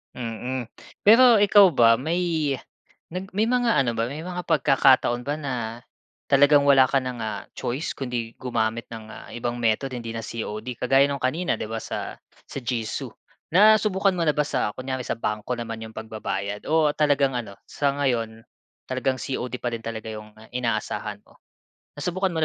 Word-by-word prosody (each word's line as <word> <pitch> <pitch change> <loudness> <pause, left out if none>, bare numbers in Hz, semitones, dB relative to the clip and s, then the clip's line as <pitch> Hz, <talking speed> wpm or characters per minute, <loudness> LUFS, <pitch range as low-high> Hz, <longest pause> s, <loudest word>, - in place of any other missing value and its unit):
Mm. 120 +1 -4 0.3
Pero 230 0 +7
ikaw 200 -3 +6
ba 115 -3 +5
may 160 0 0 0.6
nag 185 +2 -5
may 215 - +3
mga 240 -1 +2
ano 130 -4 +2
ba 115 0 -1
may 150 +5 -6
mga 180 0 -4
pagkakataon 135 -5 +4
ba 145 +4 -3
na 120 -5 -5 0.5
talagang 145 +1 +6
wala 135 -2 +6
ka 140 - 0
na 125 - -3
ng, 120 - -9
ah, 110 -1 -4
choice 130 +7 -3
kundi 120 -4 -4
gumamit 115 -2 -1
ng, 115 -1 -8
ah, - - -11
ibang 120 0 -3
method, 115 +4 0
hindi 115 -2 -5
na 115 - -5
COD 110 +2 -5
kagaya 135 +2 +4
no'ng 140 0 -2
kanina, 160 +8 -1
'di - - -4
ba, 115 - -4
sa 110 - -5 0.3
sa - - -6
Jisu. 115 -3 -3 0.4
Nasubukan 200 -1 +4
mo 170 - 0
na 150 - +3
ba 150 - +1
sa 105 - 0
kunyari 130 +1 -4
sa - - -2
bangko 105 +2 -2
naman 115 -1 -5
'yong 110 - -10
pagbabayad, 105 -2 -4
o 160 -1 +3
talagang 140 -3 +2
ano 110 -5 -6
sa 140 -1 0
ngayon, 120 -6 -1 0.5
talagang 130 0 -1
COD 125 0 -4
pa 125 - -1
rin 115 - -13
talaga 110 -1 -5
'yong 105 -1 -8 0.2
inaasahan 110 -3 -2
mo? - - -24 0.6
Nasubukan 185 +2 -1
mo 160 -2 0
130 Hz, 175 wpm, -24 LUFS, 115-150 Hz, 0.6 s, Pero